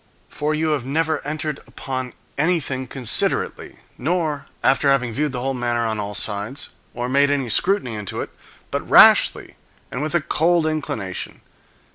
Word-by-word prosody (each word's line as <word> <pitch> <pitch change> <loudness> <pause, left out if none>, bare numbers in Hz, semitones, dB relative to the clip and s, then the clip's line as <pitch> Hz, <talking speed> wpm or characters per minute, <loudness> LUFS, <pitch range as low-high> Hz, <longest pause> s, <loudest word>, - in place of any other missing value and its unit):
For 150 +1 -1
you 160 +1 0
have 150 -4 0
never 155 +3 0
entered 150 0 -3
upon 130 -2 -5 0.2
anything 140 -5 0
considerately, 125 -4 0 0.2
nor 155 0 -1 0.2
after 135 +1 +3
having 125 -4 +2
viewed 150 +4 0
the 125 -2 -4
whole 135 +1 -1
matter 120 -2 -1
on 110 -1 -2
all 105 0 -4
sides, 105 +6 -2 0.3
or 120 0 -2
made 140 +2 +3
any 140 -4 0
scrutiny 180 - +2
into 105 -2 -5
it, - - -6 0.4
but - - -3
rashly, - - +6 0.3
and 125 - -3
with 155 +3 -2
a 170 - +3
cold 165 +2 +2
inclination. 125 -12 -4
135 Hz, 155 wpm, -21 LUFS, 120-155 Hz, 0.4 s, rashly